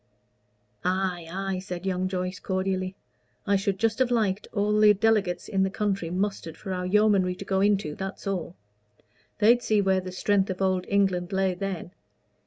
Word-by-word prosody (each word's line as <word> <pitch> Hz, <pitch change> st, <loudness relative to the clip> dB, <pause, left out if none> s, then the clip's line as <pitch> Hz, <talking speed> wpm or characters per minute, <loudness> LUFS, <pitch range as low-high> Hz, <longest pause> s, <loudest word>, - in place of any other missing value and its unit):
"Ay, 180 Hz, -2 st, -1 dB
ay," 190 Hz, 0 st, -2 dB
said 180 Hz, -1 st, -6 dB
young 185 Hz, -1 st, 0 dB
Joyce, 185 Hz, 0 st, -3 dB
cordially. 185 Hz, 0 st, -2 dB, 0.5 s
"I 200 Hz, -, +3 dB
should 195 Hz, 0 st, 0 dB
just 225 Hz, +3 st, 0 dB
have 260 Hz, -2 st, +3 dB
liked 210 Hz, -4 st, 0 dB
all 210 Hz, 0 st, +1 dB
the 210 Hz, -1 st, +7 dB
delegates 205 Hz, -3 st, +1 dB
in 195 Hz, -2 st, 0 dB
the 190 Hz, -, +2 dB
country 195 Hz, -4 st, -1 dB
mustered 185 Hz, -3 st, -3 dB
for 190 Hz, -2 st, -5 dB
our 180 Hz, 0 st, -3 dB
yeomanry 200 Hz, -2 st, +3 dB
to 200 Hz, -, -8 dB
go 190 Hz, 0 st, +1 dB
into 200 Hz, -6 st, +2 dB
that's 195 Hz, +5 st, -6 dB
all. 180 Hz, -3 st, -3 dB, 0.8 s
They'd 235 Hz, +3 st, +5 dB
see 215 Hz, -3 st, +2 dB
where 190 Hz, -1 st, +2 dB
the 185 Hz, 0 st, -7 dB
strength 195 Hz, +1 st, +1 dB
of 185 Hz, -, -3 dB
Old 185 Hz, -1 st, +1 dB
England 190 Hz, -3 st, +1 dB
lay 190 Hz, -1 st, +1 dB
then. 180 Hz, -2 st, -5 dB
190 Hz, 175 wpm, -26 LUFS, 185-205 Hz, 0.8 s, the